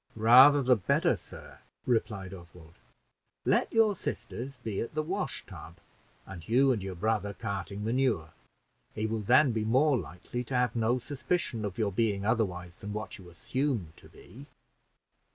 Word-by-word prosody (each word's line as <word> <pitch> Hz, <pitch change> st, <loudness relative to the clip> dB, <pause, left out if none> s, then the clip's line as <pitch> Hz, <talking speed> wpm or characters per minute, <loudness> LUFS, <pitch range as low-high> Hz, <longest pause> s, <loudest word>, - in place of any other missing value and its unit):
"Rather 130 Hz, +6 st, +7 dB
the 125 Hz, 0 st, +5 dB
better, 100 Hz, -, +1 dB
sir," -, -, -12 dB, 0.3 s
replied 110 Hz, -6 st, -1 dB
Oswald. 85 Hz, -2 st, -14 dB, 0.7 s
"Let -, -, +2 dB
your 225 Hz, -2 st, +4 dB
sisters 120 Hz, -, -6 dB
be 105 Hz, -3 st, -4 dB
at 115 Hz, -, -6 dB
the 155 Hz, -, 0 dB
wash 155 Hz, -, -3 dB
tub, 85 Hz, -3 st, -11 dB, 0.5 s
and 90 Hz, -2 st, -10 dB
you 130 Hz, +4 st, +4 dB
and 115 Hz, -5 st, -1 dB
your 95 Hz, -1 st, -5 dB
brother 105 Hz, +1 st, -1 dB
carting 100 Hz, -1 st, -5 dB
manure; 115 Hz, -8 st, 0 dB, 0.6 s
he 105 Hz, -, -2 dB
will 110 Hz, 0 st, -1 dB
then 130 Hz, +6 st, +4 dB
be 110 Hz, -1 st, -1 dB
more 130 Hz, +6 st, +3 dB
likely 90 Hz, -, -5 dB
to 130 Hz, -, -4 dB
have 125 Hz, -2 st, +1 dB
no 115 Hz, +2 st, +1 dB
suspicion 130 Hz, -1 st, -2 dB
of 100 Hz, -3 st, -4 dB
your 105 Hz, -3 st, 0 dB
being 100 Hz, -1 st, 0 dB
otherwise 90 Hz, -6 st, -1 dB
than 105 Hz, 0 st, -6 dB
what 105 Hz, 0 st, -6 dB
you 90 Hz, -2 st, -13 dB
assume 115 Hz, -, -2 dB
to -, -, -15 dB
be." 135 Hz, +5 st, -14 dB
110 Hz, 160 wpm, -29 LUFS, 95-130 Hz, 0.7 s, Rather